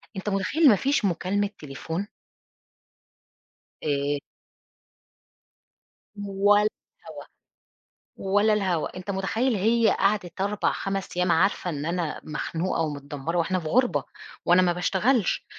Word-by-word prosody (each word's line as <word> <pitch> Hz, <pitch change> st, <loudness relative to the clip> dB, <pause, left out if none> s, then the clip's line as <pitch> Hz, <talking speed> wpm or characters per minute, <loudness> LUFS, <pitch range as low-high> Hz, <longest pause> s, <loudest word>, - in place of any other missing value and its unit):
أنتَ 190 Hz, +2 st, -3 dB
متخيِّل، 205 Hz, -, +3 dB
ما 215 Hz, -, +6 dB
فيش 270 Hz, +2 st, +1 dB
مكالمة 195 Hz, +3 st, 0 dB
تليفون؟! 160 Hz, +6 st, -5 dB, 1.8 s
آآ 145 Hz, -1 st, 0 dB, 2.0 s
ولا 205 Hz, +1 st, +3 dB, 0.3 s
الهوا، -, -, -10 dB, 0.9 s
ولا 205 Hz, +3 st, +2 dB
الهوا، 185 Hz, -5 st, -1 dB
أنتَ 185 Hz, +2 st, -5 dB
متخيِّل، 220 Hz, +6 st, 0 dB
هي 225 Hz, +3 st, +3 dB
قعدِت 195 Hz, -3 st, 0 dB
4،5 195 Hz, -2 st, -2 dB
أيَّام، 180 Hz, -1 st, +2 dB
عارِفة 185 Hz, +1 st, +2 dB
إن 145 Hz, -3 st, -4 dB
أنا 170 Hz, -2 st, -2 dB
مخنوقة 165 Hz, +3 st, -2 dB
ومتدمّرة، 145 Hz, +1 st, -3 dB
وإحنا 180 Hz, +2 st, +1 dB
في 160 Hz, -, -6 dB
غُربة، 250 Hz, +9 st, +2 dB, 0.4 s
وأنا 180 Hz, +1 st, +5 dB
ما 175 Hz, -1 st, +2 dB
باشتغَلش، 195 Hz, +5 st, +1 dB
190 Hz, 110 wpm, -25 LUFS, 170-205 Hz, 2.0 s, ما